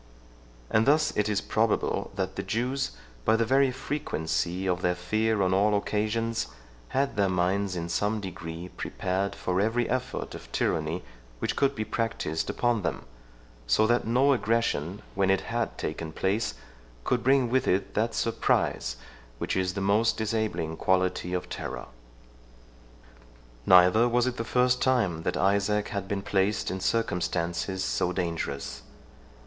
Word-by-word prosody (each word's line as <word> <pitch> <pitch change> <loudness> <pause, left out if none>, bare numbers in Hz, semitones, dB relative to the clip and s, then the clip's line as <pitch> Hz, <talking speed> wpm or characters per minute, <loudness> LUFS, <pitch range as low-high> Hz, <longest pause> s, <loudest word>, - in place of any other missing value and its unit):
27 - - -2
And 110 - +2
thus 150 +1 +3
it 105 0 +1
is 105 -2 +1
probable, 110 0 0
that 95 -1 -2
the - - -2
Jews, 125 - -1 0.3
by 110 - +4
the 115 0 +2
very 135 +3 +4
frequency 95 - -2
of 90 -1 0
their 90 -1 +1
fear 110 +4 +1
on 95 0 +2
all 105 +2 +3
occasions, 110 +2 -1 0.4
had 135 - 0
their 100 -1 +3
minds 95 +2 0
in 85 -1 -3
some 105 +6 0
degree 85 -2 -6
prepared 95 +2 -2
for 90 +1 0
every 115 +3 +1
effort 130 +1 -3
of - - -10
tyranny 80 +3 -1 0.3
which - - -2
could 140 0 +2
be 110 - -2
practised 100 -8 -2
upon 120 -3 +1
them; - - -3 0.6
so - - +4
that 120 0 +2
no 130 +4 +4
aggression, 110 - 0
when 95 0 +1
it 95 - +3
had 115 0 -2
taken 80 +1 -4
place, 95 -1 -1 0.5
could 120 - 0
bring 135 -1 +4
with 130 0 +2
it 95 +1 +1
that 115 +2 0
surprise 65 - 0 0.4
which - - -2
is 95 -1 0
the 100 - -2
most 105 +4 +2
disabling 105 -7 -1
quality 90 -1 +1
of 90 -1 -2
terror. - - -5 1.8
Neither 90 +6 +6
was 120 0 +2
it 125 -1 -2
the 115 - -1
first 125 +2 +2
time 110 -11 +2
that 90 - -1
Isaac 100 +2 +2
had 100 -2 -3
been 100 0 -2
placed 100 +1 +1
in 95 - -3
circumstances 90 -3 -1
so 90 - 0
dangerous. 80 -6 -3
100 Hz, 155 wpm, -28 LUFS, 90-115 Hz, 1.8 s, Neither